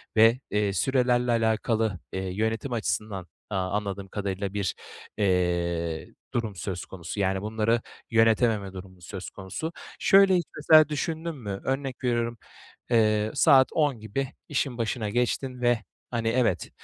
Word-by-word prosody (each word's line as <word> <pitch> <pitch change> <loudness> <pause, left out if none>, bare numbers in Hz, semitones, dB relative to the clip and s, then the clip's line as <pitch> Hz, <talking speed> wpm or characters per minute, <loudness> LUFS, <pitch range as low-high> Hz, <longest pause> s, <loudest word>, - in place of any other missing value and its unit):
ve, 115 +3 +6
eee, 105 -1 +1
sürelerle 125 +3 +2
alakalı, 110 -3 +1
eee, 95 0 -2
yönetim 110 +5 -1
açısından, 105 -4 -2 0.2
aaa, 95 -3 -1
anladığım 100 -1 -3
kadarıyla 100 -1 -3
bir, 100 -4 -1 0.4
eee, 85 -4 0 0.2
durum 110 -4 -2
söz 90 0 -4
konusu. 90 +2 -7
Yani 95 -1 +1
bunları 110 +2 +1 0.3
yönetememe 110 -3 +3
durumu 95 -1 -10
söz 95 +1 -7
konusu. 100 - -5 0.3
Şöyle 195 -1 +6
hiç, 175 - +1
mesela, 155 0 +6
düşündün 160 +2 -3
mü? 100 -7 -6
Örnek 135 -1 -3
veriyorum, 120 -1 0 0.5
eee, 110 -2 +3
saat 135 -1 +6
10 145 -6 +1
gibi 110 +6 -3 0.2
işin 135 -4 -1
başına 115 -2 -1
geçtin 125 +3 -1
ve, 120 -2 +3 0.3
hani, 115 -2 -1
evet, 115 -7 +1
110 Hz, 135 wpm, -27 LUFS, 95-125 Hz, 0.5 s, ve